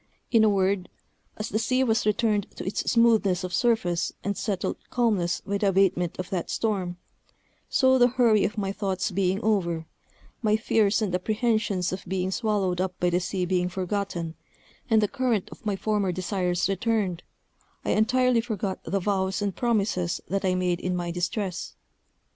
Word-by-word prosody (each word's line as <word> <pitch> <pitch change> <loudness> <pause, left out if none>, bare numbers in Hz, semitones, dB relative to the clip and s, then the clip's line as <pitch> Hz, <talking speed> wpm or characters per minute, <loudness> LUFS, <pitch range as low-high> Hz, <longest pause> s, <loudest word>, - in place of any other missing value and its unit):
In 225 -2 +5
a 215 - +5
word, 195 -2 +1 0.5
as 210 - -4
the 215 - 0
sea 255 +3 +2
was 225 -3 +1
returned 210 -1 +1
to - - -6
its 190 - -1
smoothness 220 -6 +3
of 180 -1 -4
surface 220 -8 +1
and 200 0 -1
settled 195 -4 -2
calmness 210 -8 +1
by 200 0 -2
the 205 - +2
abatement 185 -3 +2
of 185 - -5
that 180 -3 -2
storm, 190 -6 -1 0.7
so 260 -1 +4
the 245 - +7
hurry 235 -4 +3
of 215 - -1
my 195 -2 -1
thoughts 195 -1 -2
being 190 +1 +1
over, 170 -7 0 0.6
my 215 -2 +3
fears 220 -1 +2
and 195 -4 -2
apprehensions 210 -1 0
of 185 - -5
being 185 0 -1
swallowed 195 -4 0
up 185 -1 -3
by 175 0 +2
the 175 - +2
sea 185 0 -2
being 180 0 0
forgotten, 180 -2 -3 0.6
and 220 -2 +4
the - - +3
current 250 -5 0
of 225 - -10
my 205 - +1
former 205 -1 0
desires 180 -1 -1
returned, 195 -3 0 0.6
I - - +1
entirely 250 +2 +3
forgot 210 -5 -4
the 195 +4 -1
vows 190 0 0
and 205 -2 -2
promises 200 -7 0
that 195 +1 -1
I 185 -1 +2
made 180 -1 0
in 180 0 -2
my 175 -1 -2
distress. 175 - -3
195 Hz, 170 wpm, -26 LUFS, 180-220 Hz, 0.7 s, the